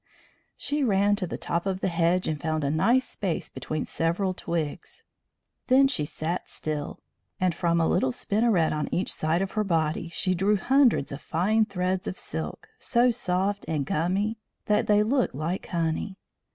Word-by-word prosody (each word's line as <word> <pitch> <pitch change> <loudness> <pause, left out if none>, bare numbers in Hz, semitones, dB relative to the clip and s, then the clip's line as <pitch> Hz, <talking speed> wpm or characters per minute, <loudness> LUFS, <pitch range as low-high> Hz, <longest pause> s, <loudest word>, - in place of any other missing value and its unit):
She 290 0 0
ran 205 -3 +3
to 185 -3 -3
the - - -5
top 170 +3 -2
of 190 -1 -1
the - - 0
hedge 175 +1 +1
and 155 -2 -2
found 155 -2 -1
a 140 - +1
nice 235 +12 +3
space 185 -6 -3
between 155 - -4
several 175 +4 0
twigs. 165 -4 -4 0.6
Then 270 +1 +6
she 205 - -1
sat 165 +4 -3
still, 150 -2 -4 0.4
and 185 -1 +2
from 170 0 +1
a 165 - +3
little 130 - +2
spinneret 205 - +1
on 150 0 -2
each 185 - -1
side 160 +4 0
of 195 - -4
her 215 - 0
body 165 -3 0
she 185 +2 0
drew 195 +4 +2
hundreds 260 - +3
of 140 - -6
fine 215 +7 +2
threads 185 -2 -2
of 185 - -4
silk, 80 -1 -6
so 245 +1 +3
soft 200 -3 -1
and 150 -4 -1
gummy 195 +9 0 0.3
that 210 +1 +2
they 210 0 +5
looked 250 - +1
like 165 +6 -3
honey. 170 +3 -2
180 Hz, 175 wpm, -26 LUFS, 160-210 Hz, 0.6 s, Then